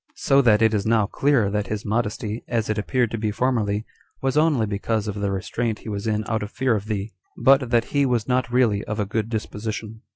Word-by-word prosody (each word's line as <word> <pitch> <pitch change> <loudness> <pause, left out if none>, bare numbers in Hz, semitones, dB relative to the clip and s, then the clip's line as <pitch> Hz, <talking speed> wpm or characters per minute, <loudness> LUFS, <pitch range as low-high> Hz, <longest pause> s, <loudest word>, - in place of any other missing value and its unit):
So 140 0 +3
that 110 -3 +4
it 110 0 +4
now 110 0 +3
is 100 - -3
clear 135 -8 +2
that 105 -1 -1
his 105 +1 -4
modesty, 110 0 -2
as 115 -3 -1
it 105 - -1
appeared 120 +1 0
to 115 - -3
be 110 0 0
formerly, 110 -2 0 0.3
was 135 0 -1
only 150 -7 +3
because 105 +1 -2
of 105 - -2
the 100 -1 -2
restraint 110 +4 -2
he - - -9
was 100 +1 -4
in 110 0 0
out 110 -1 -1
of 105 - -4
fear 130 0 +1
of 105 -1 -3
thee, 105 -1 -3 0.3
but 135 -2 +4
that 120 -1 +2
he 140 -1 +3
was 120 -4 0
not 125 -1 0
really 115 -5 +2
of 105 - -4
a 105 - +1
good 110 +2 -2
disposition. 110 0 -5
110 Hz, 230 wpm, -23 LUFS, 105-120 Hz, 0.3 s, that